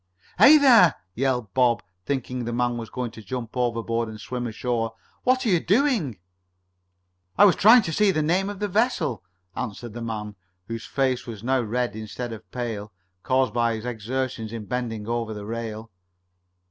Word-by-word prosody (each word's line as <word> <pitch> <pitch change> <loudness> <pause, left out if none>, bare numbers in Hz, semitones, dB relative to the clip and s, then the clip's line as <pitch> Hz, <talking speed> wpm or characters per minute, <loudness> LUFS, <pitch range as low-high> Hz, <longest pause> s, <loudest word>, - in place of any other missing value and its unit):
"Hey 300 +3 +9
there!" 240 - +6 0.2
yelled 125 -5 -1
Bob, 125 -2 +3 0.2
thinking 125 -2 -2
the 120 - -3
man 120 0 0
was 115 -2 -6
going 125 -2 -4
to 115 - -11
Jump 120 +1 -6
overboard 115 -2 -1
and 110 -1 -9
swim 125 +2 -4
ashore. 115 0 -2 0.3
"What 255 0 +2
are - - +2
you 180 -4 +4
doing?" 200 - +1 1.2
"I 205 - +8
was 195 - +5
trying 225 +3 +7
to 165 -4 -3
see 210 +4 +3
the 155 -5 +1
name 185 +5 +1
of 205 - -6
the 205 +1 -1
vessel," 200 - 0 0.3
answered 120 -1 -5
the 120 - -7
man, 105 -3 -5 0.3
whose 115 -1 -5
face 130 -3 0
was 110 -3 -7
now 130 +1 +2
red 120 +1 -2
instead 110 +2 -6
of 110 - -11
pale, 110 -4 -4 0.3
caused 130 -2 +1
by 115 -1 +1
his 110 +1 -7
exertion 125 0 -3
in 110 -1 -6
bending 115 -3 -3
over 115 -2 -2
the 105 -1 -7
rail. 115 0 -5
120 Hz, 175 wpm, -25 LUFS, 115-135 Hz, 1.2 s, Hey